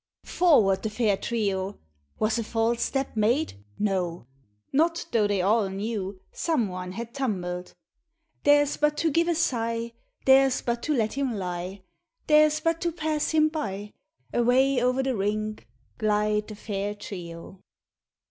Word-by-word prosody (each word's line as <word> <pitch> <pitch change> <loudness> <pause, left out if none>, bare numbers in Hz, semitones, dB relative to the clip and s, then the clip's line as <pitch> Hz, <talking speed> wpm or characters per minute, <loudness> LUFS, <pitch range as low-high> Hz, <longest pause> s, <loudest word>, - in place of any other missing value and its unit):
Forward 225 - +4
the 220 - -2
fair 215 -2 +1
trio! 200 -3 -2 0.4
Was 220 +2 +1
a - - -1
falfe 225 +1 0
step 270 +1 -1
made? 220 - 0
No 180 - -1 0.5
1 - - -43
Not 330 +4 +2
tho' 220 -3 +3
they 200 -3 0
all 205 +1 +3
knew 195 -1 -4
Some 275 - 0
one 180 0 -6
had 235 +3 -6
tumbled. 180 -9 -3 0.7
Theirs 290 0 +4
but 300 0 +2
to 325 - +1
give 335 +4 +2
a 340 - +2
sigh. 230 -6 -1 0.3
Theirs 270 -1 +5
but 235 0 -1
to 300 - 0
let 220 -3 0
him 270 -4 -1
lie. 185 0 -5 0.4
Theirs 305 0 +5
but 330 +1 0
to 345 - 0
pass 310 -2 -1
him 310 -1 +4
by, 205 -9 -4 0.4
Away 250 +2 +3
o'er 250 +2 +2
the 265 -1 0
rink 215 - -2 0.3
Glide 210 0 +1
the 215 - -8
fair 205 -1 -3
trio. 175 -3 -8
225 Hz, 150 wpm, -26 LUFS, 200-275 Hz, 0.7 s, Theirs